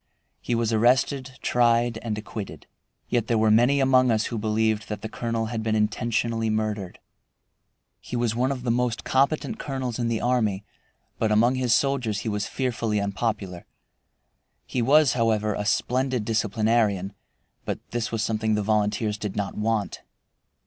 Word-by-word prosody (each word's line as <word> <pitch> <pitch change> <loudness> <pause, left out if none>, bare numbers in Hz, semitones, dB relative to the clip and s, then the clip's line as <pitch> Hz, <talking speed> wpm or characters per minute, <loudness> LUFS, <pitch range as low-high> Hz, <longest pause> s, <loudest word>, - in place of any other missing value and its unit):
He 120 - -1
was 115 -1 0
arrested, 130 +3 +2
tried, 120 -1 +2
and 110 -2 -3
acquitted. 105 -1 -7 0.4
Yet 120 -3 0
there 115 - +2
were 110 0 +3
many 120 +6 +4
among 130 -1 +4
us 110 -1 +2
who 115 - -3
believed 110 0 0
that 105 0 -5
the - - -2
colonel 115 0 -2
had 110 - -2
been 110 0 0
intentionally 115 +1 0
murdered. 110 -4 -2 1.0
He - - -7
was 120 -2 0
one 130 +3 +1
of 130 -3 -4
the 120 - +1
most 120 -1 0
competent 150 +11 +1
colonels 130 -4 -4
in 120 - 0
the 115 -1 0
army, 110 -6 0 0.6
but 110 -1 +1
among 115 +4 +4
his 125 -3 +2
soldiers 125 -7 0
he 115 - -3
was 105 -1 -2
fearfully 115 -5 -1
unpopular. 100 -3 -3 1.0
He 125 - -2
was, 145 +3 +5
however, 110 -3 +1
a 105 +1 -3
splendid 125 0 0
disciplinarian, 110 -3 +1 0.5
but - - -3
this 120 -1 -2
was 115 -1 -1
something 110 0 0
the 105 - 0
volunteers 105 0 0
did 105 -3 -4
not 100 -1 -3
want. 110 -1 -1
115 Hz, 160 wpm, -25 LUFS, 105-120 Hz, 1.0 s, was